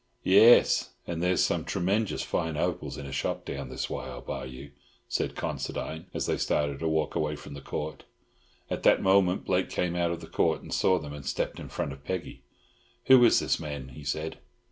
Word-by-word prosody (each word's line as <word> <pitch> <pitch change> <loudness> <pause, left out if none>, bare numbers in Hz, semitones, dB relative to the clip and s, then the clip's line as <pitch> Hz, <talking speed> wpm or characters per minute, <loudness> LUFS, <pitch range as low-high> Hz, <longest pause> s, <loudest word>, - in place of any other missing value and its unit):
"Yes, 110 +6 +6
and 85 -1 -4
there's 90 +1 +3
some - - +1
tremenjus 100 +4 0
fine 80 -2 -1
opals - - -2
in 70 - -7
a 70 - -7
shop 70 - -2
down 70 -2 -5
this 65 - -3
way - - -5
I'll 60 -1 -7
buy 65 - -5
you!" 65 +2 -9 0.4
said - - -1
Considine, 80 +1 -4
as - - -2
they - - 0
started 70 -2 0
to 80 - -1
walk 80 -1 0
away 75 0 -1
from 70 - -10
the 70 - -8
Court. 75 +3 -5 0.6
At - - -3
that - - +4
moment 95 -1 +3
Blake 95 0 +1
came 90 -1 -1
out 85 -1 +1
of 85 - -6
Court, - - 0
saw 95 - +3
them, 75 -4 -6
and 75 -1 -8
stepped 70 - -2
in - - -8
front 70 - -3
of 70 +1 -14
Peggy. 95 +2 -5 0.6
"Who 130 -2 +8
is 120 - +6
this - - 0
man?" 70 -4 -6
he 70 +3 -11
said. 75 +3 -3
80 Hz, 200 wpm, -28 LUFS, 70-90 Hz, 0.6 s, Who